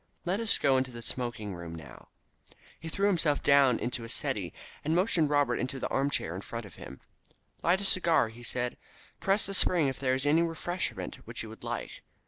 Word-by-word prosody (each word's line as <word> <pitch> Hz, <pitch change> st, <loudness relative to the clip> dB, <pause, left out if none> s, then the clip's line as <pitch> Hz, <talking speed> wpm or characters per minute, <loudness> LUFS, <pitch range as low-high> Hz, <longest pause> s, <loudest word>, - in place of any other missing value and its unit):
Let 185 Hz, +4 st, 0 dB
us 225 Hz, -1 st, +3 dB
go 135 Hz, -1 st, +3 dB
into 130 Hz, 0 st, 0 dB
the 120 Hz, -1 st, -9 dB
smoking 120 Hz, -5 st, -4 dB
room 85 Hz, -2 st, -7 dB
now." 80 Hz, -4 st, -11 dB, 0.7 s
He 165 Hz, -, -6 dB
threw 200 Hz, +4 st, 0 dB
himself 165 Hz, -7 st, +2 dB
down 140 Hz, -4 st, +6 dB
into 125 Hz, 0 st, -3 dB
a 115 Hz, -, -7 dB
settee, -, -, 0 dB, 0.3 s
and 155 Hz, +2 st, +1 dB
motioned 175 Hz, -5 st, +3 dB
Robert 145 Hz, -4 st, +2 dB
into 130 Hz, +2 st, -3 dB
the -, -, -1 dB
armchair 135 Hz, -, +1 dB
in 95 Hz, -, -5 dB
front 115 Hz, +2 st, -6 dB
of 100 Hz, -, -12 dB
him. 65 Hz, -, -10 dB, 0.6 s
"Light 180 Hz, +3 st, +3 dB
a -, -, -3 dB
cigar," 170 Hz, -10 st, +3 dB
he 115 Hz, +2 st, -13 dB
said. 125 Hz, 0 st, -3 dB, 0.4 s
"Press 195 Hz, +2 st, +3 dB
the 195 Hz, -, -4 dB
spring 175 Hz, -6 st, +3 dB
if 130 Hz, -, -6 dB
there 130 Hz, -1 st, +2 dB
is 130 Hz, +2 st, -1 dB
any 155 Hz, +3 st, +4 dB
refreshment 170 Hz, +2 st, -2 dB
which -, -, -5 dB
you -, -, -8 dB
would -, -, -12 dB
like. -, -, -5 dB
140 Hz, 205 wpm, -30 LUFS, 120-170 Hz, 0.7 s, down